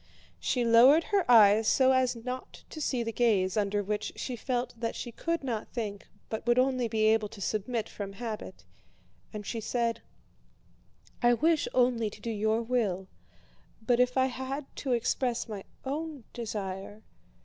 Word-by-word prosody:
She 245 Hz, -2 st, 0 dB
lowered 250 Hz, +8 st, +7 dB
her 395 Hz, -9 st, 0 dB
eyes 215 Hz, -2 st, +7 dB
so 260 Hz, -1 st, +5 dB
as 260 Hz, -1 st, +2 dB
not 250 Hz, +2 st, -7 dB
to 310 Hz, -, -7 dB
see 255 Hz, -5 st, 0 dB
the 230 Hz, -, -3 dB
gaze 210 Hz, -6 st, +2 dB
under 205 Hz, -1 st, 0 dB
which 210 Hz, +1 st, -3 dB
she 255 Hz, -, -4 dB
felt 245 Hz, +1 st, -2 dB
that 230 Hz, -1 st, -2 dB
she 240 Hz, -, -5 dB
could 335 Hz, +6 st, -2 dB
not 230 Hz, -5 st, -3 dB
think, 210 Hz, -4 st, -5 dB, 0.2 s
but 220 Hz, -, -4 dB
would 240 Hz, 0 st, +4 dB
only 255 Hz, -1 st, +2 dB
be 220 Hz, -1 st, -1 dB
able 215 Hz, -1 st, +3 dB
to 225 Hz, -, -12 dB
submit 215 Hz, +3 st, -2 dB
from 195 Hz, -1 st, -7 dB
habit, 220 Hz, 0 st, -7 dB, 0.7 s
and 210 Hz, -2 st, -7 dB
she 230 Hz, -, -3 dB
said: 230 Hz, +1 st, -1 dB, 1.2 s
"I 240 Hz, 0 st, +5 dB
wish 320 Hz, +4 st, +2 dB
only 245 Hz, -3 st, +2 dB
to 210 Hz, -, -13 dB
do 230 Hz, +2 st, -4 dB
your 220 Hz, +2 st, 0 dB
will, 210 Hz, -6 st, -1 dB, 0.7 s
but 240 Hz, +2 st, +1 dB
if 250 Hz, +1 st, +2 dB
I 260 Hz, -, +5 dB
had 265 Hz, +2 st, -4 dB
to 265 Hz, -3 st, -1 dB
express 240 Hz, +1 st, 0 dB
my 205 Hz, -3 st, -7 dB, 0.2 s
own 295 Hz, 0 st, -4 dB
desire..." 205 Hz, -2 st, -5 dB
235 Hz, 165 wpm, -29 LUFS, 215-255 Hz, 1.2 s, lowered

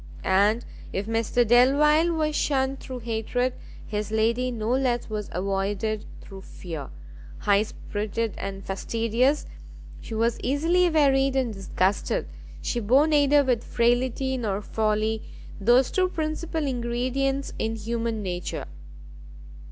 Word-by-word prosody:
And 205 Hz, +5 st, +3 dB, 0.3 s
if 195 Hz, -, -2 dB
Mr 225 Hz, +1 st, +1 dB
Delvile 295 Hz, +7 st, +5 dB
was 310 Hz, -2 st, 0 dB
shunned 270 Hz, -2 st, 0 dB
through 255 Hz, -2 st, -7 dB
hatred, 235 Hz, +2 st, -1 dB, 0.3 s
his 210 Hz, 0 st, -3 dB
lady 230 Hz, +3 st, +1 dB
no 225 Hz, -2 st, -2 dB
less 250 Hz, -3 st, 0 dB
was 210 Hz, -1 st, -3 dB
avoided 200 Hz, +3 st, -2 dB, 0.2 s
through 195 Hz, -1 st, -11 dB
fear; 165 Hz, -6 st, -8 dB, 0.5 s
high 200 Hz, 0 st, +3 dB
spirited 215 Hz, 0 st, -3 dB
and 195 Hz, 0 st, -5 dB
fastidious, 230 Hz, +7 st, 0 dB, 0.5 s
she 225 Hz, -, -7 dB
was 230 Hz, +1 st, +1 dB
easily 330 Hz, +7 st, +2 dB
wearied 275 Hz, -4 st, +3 dB
and 255 Hz, -4 st, 0 dB
disgusted, 195 Hz, -, -1 dB, 0.4 s
she 240 Hz, -, -1 dB
bore 250 Hz, +7 st, +4 dB
neither 290 Hz, -2 st, +4 dB
with 245 Hz, -3 st, +1 dB
frailty 250 Hz, +2 st, +1 dB
nor 205 Hz, -5 st, -1 dB
folly 215 Hz, +1 st, 0 dB, 0.4 s
those 240 Hz, +5 st, +4 dB
two 370 Hz, -1 st, +2 dB
principal 315 Hz, -1 st, -2 dB
ingredients 260 Hz, +2 st, -1 dB
in 225 Hz, 0 st, -1 dB
human 225 Hz, 0 st, -3 dB
nature! 180 Hz, -2 st, -4 dB
235 Hz, 120 wpm, -25 LUFS, 215-270 Hz, 0.5 s, Delvile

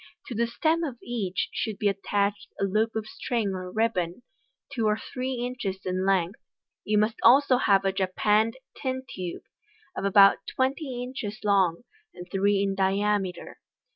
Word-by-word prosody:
To -, -, -4 dB
the 235 Hz, +1 st, 0 dB
stem 320 Hz, +7 st, +1 dB
of 270 Hz, -7 st, -4 dB
each 210 Hz, -7 st, -2 dB
should 215 Hz, -3 st, -2 dB
be 210 Hz, -, +1 dB
attached 200 Hz, 0 st, -1 dB
a -, -, 0 dB
loop 215 Hz, +4 st, +1 dB
of 220 Hz, -1 st, -2 dB
string 225 Hz, -1 st, -2 dB
or 185 Hz, -1 st, -5 dB
ribbon, 215 Hz, -2 st, -1 dB, 0.5 s
two 230 Hz, -5 st, 0 dB
or 210 Hz, 0 st, +2 dB
three 255 Hz, +3 st, -4 dB
inches 240 Hz, -6 st, -4 dB
in 185 Hz, +1 st, -1 dB
length. 190 Hz, +1 st, +1 dB, 0.4 s
You 210 Hz, 0 st, +1 dB
must 215 Hz, +2 st, +2 dB
also 260 Hz, +2 st, +6 dB
have 195 Hz, -5 st, +3 dB
a 195 Hz, -, +3 dB
japanned 210 Hz, +5 st, +1 dB, 0.2 s
tin 260 Hz, -2 st, -3 dB
tube, 180 Hz, -7 st, -6 dB, 0.5 s
of -, -, -4 dB
about 200 Hz, 0 st, +6 dB
twenty 260 Hz, -1 st, -2 dB
inches 240 Hz, -4 st, -6 dB
long, 195 Hz, -3 st, +2 dB, 0.3 s
and 180 Hz, -, -9 dB
three 200 Hz, 0 st, +2 dB
in 195 Hz, -1 st, 0 dB
diameter. 195 Hz, -1 st, -1 dB
210 Hz, 160 wpm, -27 LUFS, 195-240 Hz, 0.5 s, also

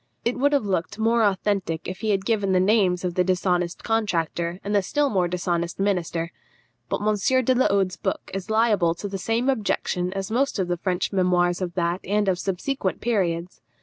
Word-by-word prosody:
It 235 Hz, -, +1 dB
would 285 Hz, +2 st, +3 dB
have 280 Hz, -7 st, +2 dB
looked 190 Hz, 0 st, -2 dB
more 230 Hz, +1 st, +2 dB
authentic 195 Hz, -5 st, 0 dB
if 185 Hz, -, -5 dB
he 220 Hz, -, -2 dB
had 195 Hz, -2 st, +1 dB
given 205 Hz, -4 st, +1 dB
the 185 Hz, -, +4 dB
names 185 Hz, -2 st, +3 dB
of 180 Hz, -, -1 dB
the 180 Hz, -, +2 dB
dishonest 180 Hz, -1 st, 0 dB
contractor 175 Hz, -5 st, -1 dB
and 205 Hz, -, -3 dB
the 205 Hz, -, +4 dB
still 285 Hz, +8 st, 0 dB
more 185 Hz, -3 st, +2 dB
dishonest 175 Hz, -1 st, -2 dB
minister. 175 Hz, -4 st, -1 dB, 0.6 s
But -, -, -1 dB
M. 220 Hz, +5 st, +2 dB
de 255 Hz, -, +4 dB
la 255 Hz, +1 st, +3 dB
Hode's 195 Hz, -2 st, +1 dB
book -, -, -3 dB
is 195 Hz, +1 st, -5 dB
liable 215 Hz, -7 st, +3 dB
to 205 Hz, -, -5 dB
the 195 Hz, -1 st, -5 dB
same 225 Hz, +6 st, 0 dB
objection 200 Hz, -7 st, 0 dB
as 195 Hz, +1 st, -4 dB
most 270 Hz, +3 st, +1 dB
of 185 Hz, -2 st, -1 dB
the 175 Hz, -, 0 dB
French 180 Hz, +2 st, -1 dB
memoirs 180 Hz, -1 st, +2 dB
of 175 Hz, -2 st, -3 dB
that 175 Hz, 0 st, 0 dB
and 205 Hz, +1 st, 0 dB
of 185 Hz, -2 st, +1 dB
subsequent 195 Hz, +3 st, -2 dB
periods. 180 Hz, -6 st, -1 dB
190 Hz, 200 wpm, -24 LUFS, 180-215 Hz, 0.6 s, the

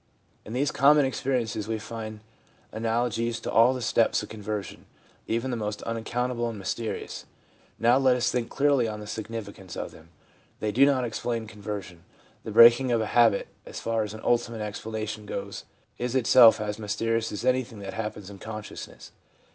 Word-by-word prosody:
In 110 Hz, -, -7 dB
these 135 Hz, +3 st, +1 dB
common 145 Hz, +1 st, +5 dB
experiences 125 Hz, -5 st, -1 dB
we 110 Hz, 0 st, -1 dB
find 110 Hz, -1 st, -7 dB, 0.5 s
analogies 115 Hz, +1 st, -1 dB
to -, -, -4 dB
all 120 Hz, +3 st, +5 dB
the 125 Hz, -, -4 dB
steps 115 Hz, +1 st, +2 dB
of -, -, -9 dB
conversion, 105 Hz, -1 st, -6 dB, 0.4 s
even 115 Hz, +3 st, -1 dB
the -, -, -1 dB
most 105 Hz, -2 st, -4 dB
unaccountable 120 Hz, +1 st, -2 dB
and 115 Hz, -, -6 dB
mysterious. 105 Hz, +4 st, -4 dB, 0.5 s
Now 120 Hz, +3 st, +4 dB
let 130 Hz, -2 st, +4 dB
us 120 Hz, -, +1 dB
think 120 Hz, -2 st, -1 dB
clearly 140 Hz, -4 st, +2 dB
on 105 Hz, -1 st, -5 dB
the 105 Hz, -, -8 dB
significance 105 Hz, -4 st, -7 dB
of -, -, -4 dB
them. 80 Hz, +1 st, -16 dB, 0.5 s
They 110 Hz, -, -1 dB
do 135 Hz, +6 st, +5 dB
not 130 Hz, -3 st, +2 dB
explain 115 Hz, 0 st, -3 dB
conversion. 100 Hz, -5 st, -7 dB, 0.4 s
The -, -, -6 dB
breaking 120 Hz, +2 st, +7 dB
of 115 Hz, -, +3 dB
a 110 Hz, -, 0 dB
habit, 115 Hz, -4 st, +4 dB
as -, -, -8 dB
far 115 Hz, -1 st, -1 dB
as 105 Hz, 0 st, -4 dB
ultimate 115 Hz, 0 st, 0 dB
explanation 105 Hz, 0 st, -5 dB
goes, -, -, -5 dB, 0.3 s
is 125 Hz, +1 st, -2 dB
itself 120 Hz, -2 st, +7 dB
as 105 Hz, 0 st, -3 dB
mysterious 115 Hz, +2 st, -1 dB
as 105 Hz, +3 st, -5 dB
anything 130 Hz, -3 st, +1 dB
that 95 Hz, -1 st, -6 dB
happens 105 Hz, -3 st, -5 dB
in 100 Hz, -, -11 dB
consciousness. 110 Hz, 0 st, -8 dB
115 Hz, 170 wpm, -27 LUFS, 105-120 Hz, 0.5 s, breaking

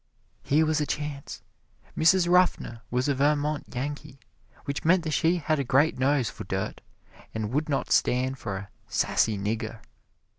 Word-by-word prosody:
Here 155 Hz, +3 st, +2 dB
was 155 Hz, 0 st, +1 dB
a 150 Hz, -, -1 dB
chance. 145 Hz, -2 st, -5 dB, 0.5 s
Mrs. 175 Hz, +2 st, +4 dB
Ruffner 175 Hz, -10 st, +2 dB
was 125 Hz, +2 st, 0 dB
a 145 Hz, -, +2 dB
Vermont 145 Hz, +1 st, +1 dB
Yankee, 145 Hz, +2 st, -5 dB, 0.5 s
which 140 Hz, 0 st, -3 dB
meant 175 Hz, +2 st, +4 dB
that 160 Hz, -, -3 dB
she 165 Hz, +3 st, +2 dB
had 155 Hz, -2 st, 0 dB
a -, -, +1 dB
great 135 Hz, +3 st, +2 dB
nose 135 Hz, -2 st, +2 dB
for -, -, -7 dB
dirt, -, -, -4 dB, 0.5 s
and 110 Hz, -1 st, -2 dB
would 150 Hz, +2 st, 0 dB
not 140 Hz, -, -1 dB
stand 130 Hz, +2 st, +2 dB
for 100 Hz, -6 st, -4 dB
a 95 Hz, 0 st, -8 dB, 0.2 s
"sassy 110 Hz, -2 st, +1 dB
nigger." 110 Hz, +3 st, -3 dB
145 Hz, 160 wpm, -27 LUFS, 125-155 Hz, 0.5 s, Mrs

